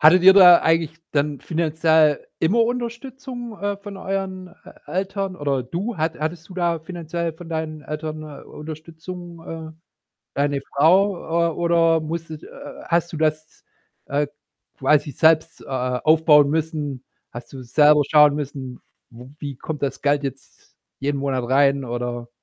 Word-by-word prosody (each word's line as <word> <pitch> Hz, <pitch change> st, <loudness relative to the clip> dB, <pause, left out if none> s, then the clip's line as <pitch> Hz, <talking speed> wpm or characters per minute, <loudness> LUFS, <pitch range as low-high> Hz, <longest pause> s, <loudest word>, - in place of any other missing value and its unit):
Hattet 165 Hz, +4 st, +7 dB
ihr 190 Hz, +1 st, +9 dB
da 180 Hz, -3 st, +8 dB
eigentlich 165 Hz, 0 st, +1 dB
dann 145 Hz, -1 st, 0 dB
finanziell 160 Hz, -2 st, +2 dB
immer 205 Hz, +9 st, +3 dB
Unterstützung, 245 Hz, 0 st, -5 dB
äh, 205 Hz, 0 st, -1 dB
von 200 Hz, 0 st, -9 dB
euren 190 Hz, -1 st, -4 dB
E 180 Hz, -, -17 dB, 0.2 s
Eltern? 190 Hz, +2 st, -2 dB
Oder 140 Hz, -4 st, -1 dB
du, 185 Hz, -, -4 dB
hat 160 Hz, 0 st, -2 dB
hattest 160 Hz, +1 st, -4 dB
du 185 Hz, -, -11 dB
da 170 Hz, -2 st, 0 dB
finanziell 170 Hz, 0 st, -4 dB
von 165 Hz, +1 st, -12 dB
deinen 160 Hz, -2 st, -4 dB
Eltern, 155 Hz, +1 st, -5 dB
äh, 150 Hz, -2 st, -10 dB
Unterstützung? 165 Hz, +3 st, -9 dB
Äh, 160 Hz, -1 st, -7 dB, 0.6 s
deine 140 Hz, 0 st, 0 dB, 0.2 s
Frau 170 Hz, +1 st, +3 dB
äh, -, -, -6 dB
oder 165 Hz, -1 st, +3 dB
musstet 160 Hz, 0 st, -6 dB
äh, -, -, -11 dB
äh, -, -, -11 dB
hast 170 Hz, 0 st, +1 dB
du -, -, -5 dB
das, 155 Hz, 0 st, -2 dB, 0.4 s
äh, 145 Hz, +1 st, 0 dB, 0.5 s
quasi 145 Hz, +2 st, +2 dB
selbst, 160 Hz, +3 st, +2 dB
äh, -, -, -14 dB
aufbauen 145 Hz, +3 st, +3 dB
müssen? 150 Hz, -4 st, -2 dB, 0.3 s
Hast 120 Hz, 0 st, -9 dB
du 135 Hz, -1 st, -8 dB
selber 150 Hz, +4 st, +5 dB
schauen 150 Hz, -1 st, +6 dB
müssen, 135 Hz, -3 st, -6 dB, 0.3 s
w 120 Hz, +2 st, -12 dB
wie 140 Hz, -4 st, -6 dB
kommt 150 Hz, +3 st, -6 dB
das 140 Hz, -, -2 dB
Geld 145 Hz, 0 st, +2 dB
jetzt 135 Hz, -1 st, -9 dB, 0.2 s
jeden 140 Hz, +1 st, -1 dB
Monat 130 Hz, -3 st, -2 dB
rein, 140 Hz, +1 st, +3 dB
oder 120 Hz, 0 st, -4 dB
160 Hz, 155 wpm, -22 LUFS, 145-175 Hz, 0.6 s, ihr